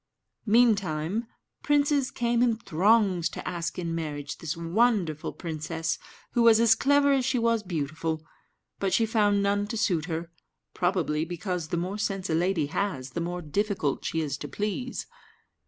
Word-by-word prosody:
Meantime, 205 -3 +2 0.3
princes 290 -2 +2
came 235 0 0
in 240 -2 +3
throngs 195 -2 +2
to - - -7
ask 170 -1 -3
in 170 -2 -2
marriage 150 -3 -4
this 160 -1 -4
wonderful 170 -2 +1
princess, 160 -1 -3 0.3
who 240 - +1
was 230 -1 +7
as 230 -1 +6
clever 285 +3 +3
as 270 -2 +3
she 260 0 +1
was 230 -1 +2
beautiful; 160 -2 -3 0.5
but 195 -1 0
she 225 - +3
found 205 -2 +2
none 205 +1 +1
to 225 - -4
suit 175 -8 +1
her, 165 0 -4 0.4
probably 175 -4 0
because 175 0 -3
the 170 - -2
more 185 +5 -3
sense 195 -3 -2
a - - +2
lady 170 -1 +1
has, 145 -5 -3
the 170 - -3
more 175 +1 -3
difficult 185 -2 -1
she 160 - -1
is 145 -2 -3
to 145 - -5
please. 210 - -3
185 Hz, 160 wpm, -27 LUFS, 160-225 Hz, 0.5 s, was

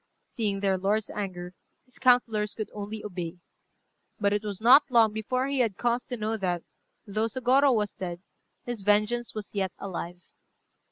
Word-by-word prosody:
Seeing 205 -4 -3
their 195 -2 +1
lord's 205 +3 0
anger, 180 -3 -5 0.3
his 255 - -18
councillors 230 -5 +3
could 215 - -5
only 210 +1 -6
obey. 180 -3 -5 0.8
But 200 -1 +2
it 205 - 0
was 205 -3 -4
not 250 +6 +8
long 230 -4 +5
before 255 +4 -1
he 275 0 -1
had 225 -6 +1
cause 240 0 0
to 245 - -5
know 220 +1 -2
that, 180 -4 -2 0.4
though 215 +2 -1
Sôgorô 260 +2 +3
was 210 -2 -1
dead, 175 -2 -5 0.5
his 240 -4 -4
vengeance 210 +4 +1
was 215 -2 -6
yet 190 -3 -1
alive. 175 -2 -6
210 Hz, 165 wpm, -27 LUFS, 195-240 Hz, 0.8 s, not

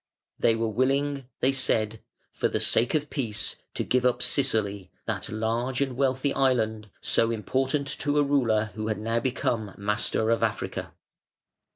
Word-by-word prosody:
"They 115 - +4
were 115 0 0
willing", 135 +4 0
they 130 - +4
said, 110 -5 0 0.3
"for - - +1
the - - -1
sake 120 +6 +3
of 150 -1 -1
peace 105 -6 -1 0.2
to - - 0
give 125 0 +1
up 125 -1 +2
Sicily, 105 - +1 0.2
that - - -3
large 115 +4 -1
and 135 -3 0
wealthy 135 +1 +1
island, 110 -5 +1
so 115 - +2
important 130 +6 0
to 145 0 0
a 145 - +5
ruler 115 -7 +2
who 110 +1 -4
had 110 -2 -1
now 115 +2 0
become 115 -4 -1
master 105 +2 0
of 115 - +2
Africa". - - -2
120 Hz, 160 wpm, -27 LUFS, 110-135 Hz, 0.3 s, a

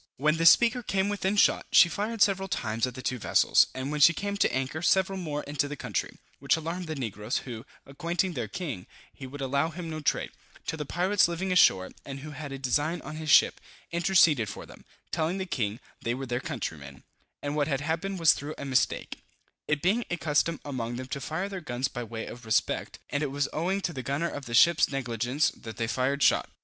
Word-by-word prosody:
When 155 +3 +2
the 165 0 +4
Speaker 240 +6 +6
came 195 -3 0
within 200 -1 -1
shot, 205 - +3
she - - +8
fired 210 +5 0
several 195 -1 +1
times 115 - -1
at 125 - -7
the 130 - -8
two 125 - -2
vessels; - - +4
and 130 +2 -3
when 150 0 -2
she 170 +4 +7
came 200 0 -3
to - - +2
anchor, 135 +4 -2
several 190 +2 +2
more 150 -4 -3
into 145 0 -1
the 150 - -5
country, - - -4 0.2
which 140 +3 +2
alarmed 165 +2 -4
the 155 - -4
negroes, 110 -2 -3
who, 120 -1 -8 0.2
acquainting 170 +6 -2
their 120 -7 -3
king, 120 - -5 0.3
he 135 - -9
would 140 +2 -9
allow 140 +4 0
him 165 0 -7
no 155 - -4
trade, 150 - -1 0.3
till 160 - -3
the 150 -2 -5
pirates 185 +5 +3
living 180 +2 -3
ashore, 95 - +4
and 135 -1 -7
who 155 +1 -8
had 145 -1 -7
a 135 - -5
design 145 +6 0
on 155 +2 -7
his 155 -1 -5
ship, - - +5 0.3
interceded 170 - +4
for - - -8
them, - - -15 0.3
telling 165 +3 0
the 190 - -3
king, 115 - -2 0.2
they 120 +1 -1
were 135 +1 -5
their 120 -1 -2
countrymen, 70 -3 -6 0.4
and 145 +1 -2
what 145 -1 +1
had 140 -2 -1
happened 170 +6 -2
was 165 -3 +6
through 145 +2 -6
a 140 - -6
mistake, 130 -2 0 0.5
it 150 -1 0
being 210 +7 +2
a 175 - -1
custom 160 +1 +1
among 120 -4 -4
them 130 +1 -5
to 140 +1 -5
fire 160 +8 -3
their 195 -2 -6
guns 130 -4 -2
by 120 -3 -6
way 115 0 -6
of 120 - -9
respect, 110 -1 0
and 145 - 0
it 150 - -1
was 140 +1 -1
owing 180 +5 0
to 190 -3 -3
the 130 - -4
gunner 140 +7 -1
of 145 -1 -7
the 120 - -2
ship's 170 +4 +5
negligence 125 +1 0
that 115 -1 -10
they 115 - 0
fired 130 +4 0
shot. - - +3
150 Hz, 225 wpm, -28 LUFS, 130-170 Hz, 0.5 s, she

